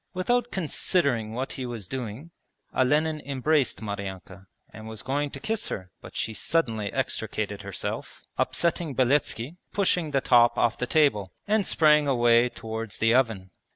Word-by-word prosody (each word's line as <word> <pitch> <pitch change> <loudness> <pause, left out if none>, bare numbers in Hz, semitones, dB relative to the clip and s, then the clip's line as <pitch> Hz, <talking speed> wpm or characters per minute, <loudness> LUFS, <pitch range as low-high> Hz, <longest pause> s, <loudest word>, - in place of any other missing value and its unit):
Without 240 +6 +1
considering 140 - 0
what 130 +3 -3
he 130 - -5
was 115 -6 -6
doing 130 - -6 0.4
Olenin 150 +4 +2
embraced 140 -2 0
Maryanka 95 -2 -6 0.3
and 110 0 -9
was 110 -1 -6
going 145 +2 -1
to 135 - -8
kiss 220 +8 -2
her, 90 -2 -6
but - - -12
she 110 - -2
suddenly 110 -7 0
extricated - - -2
herself, - - -5
upsetting 170 -4 0
Beletski 130 -2 +2
and 165 +5 -16 0.2
pushing 180 -5 +1
the 140 -2 +2
top 120 -2 +5
off 120 -1 +2
the 125 - -1
table, 115 - +2 0.2
and 210 -2 +2
sprang 150 -2 +5
away 120 -2 +4
towards 110 -2 -6
the 115 +1 +3
oven. 110 -8 +1
130 Hz, 155 wpm, -26 LUFS, 110-150 Hz, 0.4 s, top